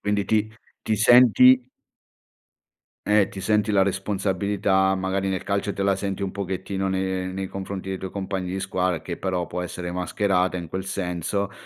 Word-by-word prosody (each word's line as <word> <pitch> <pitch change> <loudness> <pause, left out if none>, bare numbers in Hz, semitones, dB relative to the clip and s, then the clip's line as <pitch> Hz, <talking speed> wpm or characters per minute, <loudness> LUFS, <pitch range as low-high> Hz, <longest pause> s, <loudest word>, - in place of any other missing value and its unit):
Quindi 105 0 0
ti 110 0 +1 0.3
ti 110 - 0
senti 125 +2 +6 1.4
Eh, 105 -2 +4
ti 95 - -8
senti 105 +2 +1
la 95 -1 +5
responsabilità, 95 0 0
magari 95 +1 -1
nel 95 -1 -2
calcio 100 +1 -1
te 100 - -2
la 100 0 +3
senti 100 0 -3
un 95 - -2
pochettino 95 0 -3
ne 95 0 -1
nei 95 0 -3
confronti 95 0 -6
dei 95 - -2
tuoi 95 0 -6
compagni 95 -1 -3
di 95 +1 -3
squadra, 90 -3 -1
che 85 +1 -6
però 90 -2 -2
può 90 - -4
essere 90 0 -5
mascherata 90 +1 0
in 85 -3 -5
quel 95 +2 -4
senso, 95 +1 -2
95 Hz, 170 wpm, -24 LUFS, 95-100 Hz, 1.4 s, senti